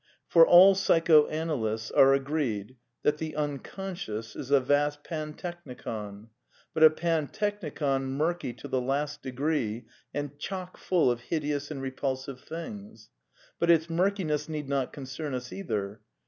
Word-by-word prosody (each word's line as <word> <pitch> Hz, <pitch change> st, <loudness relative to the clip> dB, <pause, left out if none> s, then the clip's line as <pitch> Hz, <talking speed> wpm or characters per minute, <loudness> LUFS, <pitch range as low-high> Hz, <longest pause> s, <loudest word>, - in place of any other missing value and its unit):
For 165 Hz, -1 st, +7 dB
all 185 Hz, +3 st, +9 dB
psychoanalysts 155 Hz, -, +2 dB
are 135 Hz, 0 st, +6 dB
agreed 135 Hz, -6 st, -2 dB, 0.3 s
that 150 Hz, 0 st, +2 dB
the 160 Hz, -1 st, -4 dB
Un 145 Hz, -2 st, -1 dB
conscious 130 Hz, -, -6 dB
is 130 Hz, -, -7 dB
a 140 Hz, -1 st, +6 dB
vast 145 Hz, +2 st, +1 dB
pantechnicon; 145 Hz, -, -6 dB, 0.4 s
but 160 Hz, -, -2 dB
a 155 Hz, -, +11 dB
pantechnicon 155 Hz, -3 st, -1 dB
murky 150 Hz, +2 st, -1 dB
to -, -, -10 dB
the 130 Hz, -, 0 dB
last 145 Hz, +3 st, -2 dB
degree 130 Hz, -4 st, -2 dB, 0.3 s
and 145 Hz, 0 st, -5 dB
chock 185 Hz, +2 st, -5 dB
full 175 Hz, -9 st, +2 dB
of 120 Hz, -, -2 dB
hideous 145 Hz, -3 st, -1 dB
and 140 Hz, -3 st, -5 dB
re 135 Hz, -, -3 dB
pulsive 130 Hz, 0 st, -3 dB
things. 200 Hz, +6 st, -9 dB, 0.5 s
But 170 Hz, -, +1 dB
its 165 Hz, 0 st, +4 dB
murkiness 165 Hz, -4 st, 0 dB
need 150 Hz, -3 st, -4 dB
not 135 Hz, -2 st, -1 dB
concern 135 Hz, +1 st, -5 dB
us 125 Hz, -1 st, -6 dB
either. 105 Hz, -, -4 dB
145 Hz, 140 wpm, -28 LUFS, 130-165 Hz, 0.5 s, a